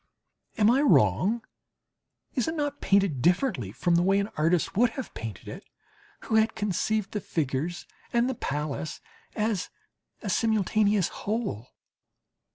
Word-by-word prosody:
Am 215 +1 +5
I 265 +3 +3
wrong? 185 - +3 0.9
Is 255 - 0
it 320 - -2
not 290 -2 -2
painted 195 -9 +2
differently 175 - +1
from 175 - 0
the 170 - +4
way 195 +2 +3
an 200 +1 -1
artist 165 +2 +1
would 240 +4 +4
have 265 - -5
painted 110 -4 -7
it - - -8 0.6
who 220 - +1
had 220 +1 +2
conceived 210 0 -1
the 210 - -3
figures 155 +2 -2 0.3
and 235 0 +2
the 260 - -1
palace 150 - -4 0.4
as 210 -4 -1 0.5
a - - -3
simultaneous 215 -3 +2
whole? 205 - -3
200 Hz, 140 wpm, -27 LUFS, 160-225 Hz, 0.9 s, Am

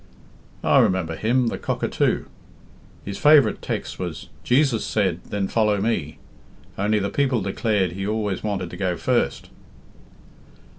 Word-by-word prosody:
"I - - +5
remember 90 -3 +1
him 120 +5 +1
the - - -5
Cockatoo. - - 0 0.8
His 100 0 -5
favourite 150 -2 +5
text - - -4
was, - - -5
'Jesus 125 -3 +2
said, 95 -5 -1
then 100 -1 -2
follow 105 -2 +1
Me,' 95 -8 -1 0.6
only 105 +2 +1
the 100 -1 -1
people 135 -4 +1
declared 100 -1 0
he 95 +2 -4
always 105 -3 -1
wanted 95 -5 -3
to 90 - -8
go 90 -2 -1
first." - - -1
105 Hz, 135 wpm, -23 LUFS, 95-115 Hz, 0.8 s, I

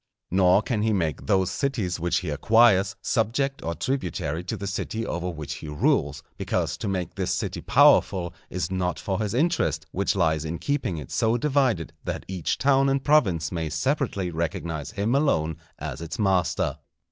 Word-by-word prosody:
Nor 95 +2 +4
can 110 -3 -1
he 110 0 +2
make 80 -7 -1
those 95 -3 +2
cities 105 -9 -1
which 85 +2 0
he 90 - -4
acquires, 105 +3 +4
subject 135 +5 0
or 85 0 -3
tributary 85 - -2
to 110 - -3
the 100 - -5
city 110 +3 -3
over 85 +1 -3
which 80 -4 -5
he - - -8
rules; 75 0 0
because - - -1
to - - -4
make 90 -4 -2
this - - -2
city - - -2
powerful 85 -2 +4 0.2
is 90 +1 -3
not 90 -1 -1
for 95 0 -2
his 105 +1 -2
interest, 125 - +1
which 100 +2 0
lies 80 -5 +1
in 80 +1 -3
keeping 140 - -1
it 75 - -8
so 115 +1 +2
divided 130 - +1
that - - -4
each 90 -4 -2
town 135 0 +3
and 135 0 0
province 95 - +3
may 80 -3 -2
separately 100 - -1
recognize 80 -2 -3
him 110 +2 -1
alone 80 - +1 0.2
as - - -6
its 85 +7 -5
master. 95 -5 +1
95 Hz, 175 wpm, -25 LUFS, 85-115 Hz, 0.2 s, Nor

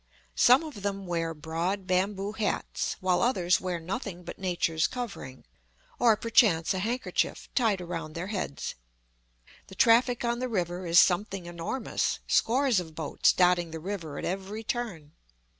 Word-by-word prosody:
Some 250 +6 +5
of 295 -10 -8
them 195 -1 -3
wear 165 -2 -1
broad 170 +6 -3
bamboo 195 +2 0
hats, 215 -1 -2
while 185 -1 +2
others 185 -8 +2
wear 180 -2 -2
nothing 180 +1 -5
but 170 - -9
nature's 175 -4 0
covering, 215 - -7 0.5
or 230 -3 +5
perchance 205 -8 +3
a 190 - -2
handkerchief 235 +6 -1
tied 220 -7 +2
around 165 -3 -5
their 170 +2 -3
heads. 165 -8 -3 0.9
The 190 - -12
traffic 240 +3 +4
on 235 0 0
the 255 0 -2
river 180 -3 -2
is 170 +1 +6
something 190 0 +2
enormous, 175 +9 -2
scores 255 -2 +3
of 160 -3 -8
boats 160 -2 +2
dotting 180 -2 +3
the 160 0 -6
river 165 -5 -5
at - - -4
every 195 +4 -4
turn. 215 -11 -4
185 Hz, 150 wpm, -28 LUFS, 170-220 Hz, 0.9 s, is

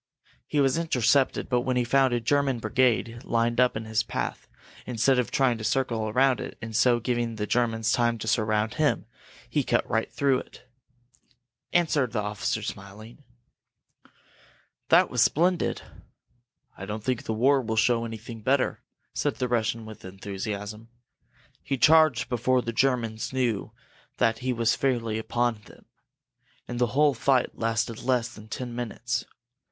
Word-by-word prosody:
He 150 - 0
was 135 +3 +3
intercepted 135 -4 +2
but 125 -2 +1
when 125 0 -1
he 125 - +2
found 135 +2 +3
a 120 - +1
German 135 +2 +1
brigade 115 0 +1
lined 115 +1 0
up 125 -3 +3
in 110 - -6
his 110 0 +1
path, 105 -2 -4 0.4
instead 125 +2 +2
of 125 - 0
trying 125 -4 +1
to - - -6
circle 115 -3 0
around 130 +3 +3
it, - - -7
and 110 -1 -7
so 120 +1 +4
giving 120 -1 -1
the 105 -1 -2
Germans 115 0 0
time 120 -2 +2
to 110 - -6
surround 110 -1 +1
him, - - +1 0.4
he - - 0
cut - - +1
right 110 0 -1
through 135 -2 +2
it!" 125 - -14 1.0
answered 150 -8 +1
the 110 - 0
officer, 105 0 -2
smiling. 105 +6 -9 1.7
"That - - +5
was - - +1
splendid!" 175 +3 +2 0.9
"I 95 - -8
don't 105 +1 -5
think 125 -1 -1
the 110 - -2
war 135 +5 +3
will 110 -2 -3
show 115 +1 +2
anything 115 0 -7
better!" 130 +3 +1 0.3
said - - -1
the 125 - -2
Russian, 115 -1 -1
with 110 -2 -11
enthusiasm. 100 +3 -6 0.7
"He 135 - -2
charged 155 -2 +5
before 125 +1 +1
the 115 - -4
Germans 115 -3 0
knew 120 -6 -1 0.5
that 115 0 +2
he 130 0 -1
was 115 -2 +1
fairly 115 -5 -1
upon 115 0 -1
them, - - -17 0.8
and 120 0 -5
the 120 - +3
whole 150 -1 +5
fight 130 +1 +1
lasted 115 0 -1
less 120 -2 0
than 105 0 -12
ten 120 +2 -5
minutes. 120 0 -3
120 Hz, 155 wpm, -26 LUFS, 110-130 Hz, 1.7 s, That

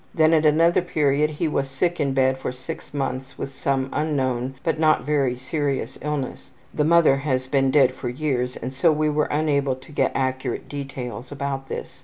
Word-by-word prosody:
Then 160 0 +4
at 155 -1 +4
another 165 +4 +4
period 150 -3 +1
he 155 +2 -2
was 140 -2 -1
sick 170 +6 -1
in 140 -2 0
bed 130 0 +2
for - - -3
6 130 0 -8
months 135 -2 -4
with 135 - -5
some 135 0 0
unknown, 135 -4 -1
but 165 -2 0
not 155 -1 +3
very 140 -4 +1
serious 140 +2 -3
illness. 150 -2 -4 0.2
The 150 - +1
mother 160 -3 +5
has 130 -2 -1
been 135 0 +2
dead 130 -2 +4
for 130 -1 -5
years 125 -2 -1
and 130 - -5
so 135 +5 +3
we 155 0 +1
were 150 0 +1
unable 145 -3 +1
to 130 +4 -15
get 145 - +1
accurate 130 -1 -2
details 135 -3 -6
about 140 -1 -4
this. - - -6
140 Hz, 190 wpm, -23 LUFS, 130-150 Hz, 0.2 s, mother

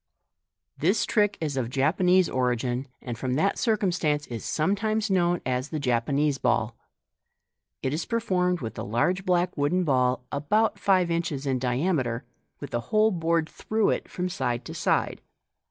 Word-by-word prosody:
— - - -57
This 195 +5 +3
trick 210 -2 +2
is 150 -4 -2
of 125 -3 -1
Japanese 180 +7 +3
origin, 125 +1 -1 0.2
and 120 -2 -4
from 130 -1 -1
that 195 +7 +1
circumstance 180 - +1
is 115 -2 -6
sometimes 210 +6 0
known 175 -2 +2
as 130 +2 -1
the 155 - -3
Japanese 140 +2 +1
Ball. 120 -2 +1 1.1
It 130 - 0
is 155 - -2
performed 180 -7 0
with 115 -3 -5
a - - -3
large 175 - 0
black 180 0 +2
wooden 160 +5 +1
ball, 125 -4 +1
about 205 +9 +1
five 185 -3 +3
inrhes 165 -4 -2
in 130 -2 0
diameter, 125 -1 0 0.3
with - - -8
a 120 - +1
hole 215 +1 +4
bored 165 -2 0
through 220 +5 0
it - - -3
from 180 0 -3
side 120 -10 -2
to - - -7
side. - - 0
155 Hz, 160 wpm, -26 LUFS, 130-185 Hz, 1.1 s, hole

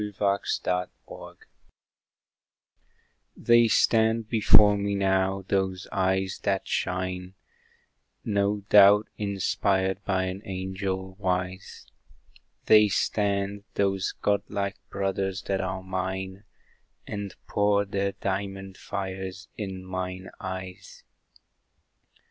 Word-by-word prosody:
The 105 -1 -5
Living 100 -2 0 0.2
Torch - - -11 2.0
They 120 0 +5
stand 110 0 +3
before 105 -2 +6
me 100 0 -1
now, 95 0 +1
those 95 -1 -1
eyes 95 0 0
that 95 -2 -1
shine, 90 0 -2 0.9
No 100 -1 +1
doubt 105 +1 +7
inspired 95 -1 0
by 95 -1 0
an 95 +1 -4
Angel 95 0 -4
wise; 90 -1 -3 0.8
They 105 -1 +7
stand, 100 0 0
those 95 -2 0
God 100 -1 +2
like 100 -2 -2
brothers 95 -1 -2
that 95 -1 -1
are 95 0 -3
mine, 95 +1 -4 0.6
And 100 -3 -5
pour 100 0 +2
their 100 0 -1
diamond 95 0 -4
fires 95 +1 -5
in 95 -3 -6
mine 95 0 -5
eyes. 95 -1 -7
95 Hz, 95 wpm, -27 LUFS, 95-100 Hz, 2.0 s, doubt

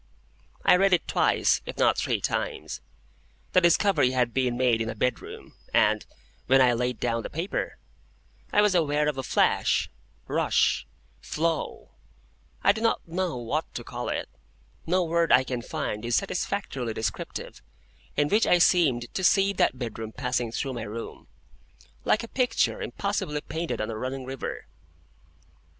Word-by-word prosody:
I - - +7
read 195 0 +3
it 175 - +2
twice, - - +2
if - - -6
not - - +4
three - - 0
times. - - -3 0.7
The 185 - +6
discovery 170 -6 +3
had 125 -2 +1
been 125 -2 0
made 125 -3 +2
in 115 - -2
a 115 - -4
bedroom, 125 +2 -3 0.2
and, - - +3 0.4
when 135 +1 +5
I 125 -2 +5
laid 125 0 -1
down 115 -1 0
the - - -6
paper, 170 +6 -3 0.7
I 210 - +4
was 210 -2 +3
aware 150 -3 +2
of 145 -3 -1
a - - -3 2.0
flash—rush—flow—I 155 - -3
do 220 +2 -4
not 230 -5 0
know 175 -3 -2
what 120 -2 -3
to - - -4
call - - -5
it,—no 65 - -4
word 170 0 +1
I 130 - +6
can 125 -1 -4
find 120 -6 -4
is 120 0 0
satisfactorily 135 - -2
descriptive,—in 145 +5 -5
which 215 +2 +3
I 180 - +5
seemed 145 -10 +3
to 190 - -2
see 195 +2 +4
that 155 - +1
bedroom 115 -3 -5
passing 125 -2 -1
through 135 +3 -3
my 120 - -5
room, 115 +3 -7 0.8
like 215 - +2
a - - -6
picture 255 - 0
impossibly 200 - -2
painted 165 +2 -4
on 110 +1 -2
a - - -5
running 130 +1 -4
river. 135 0 -5
135 Hz, 145 wpm, -26 LUFS, 120-180 Hz, 2.0 s, I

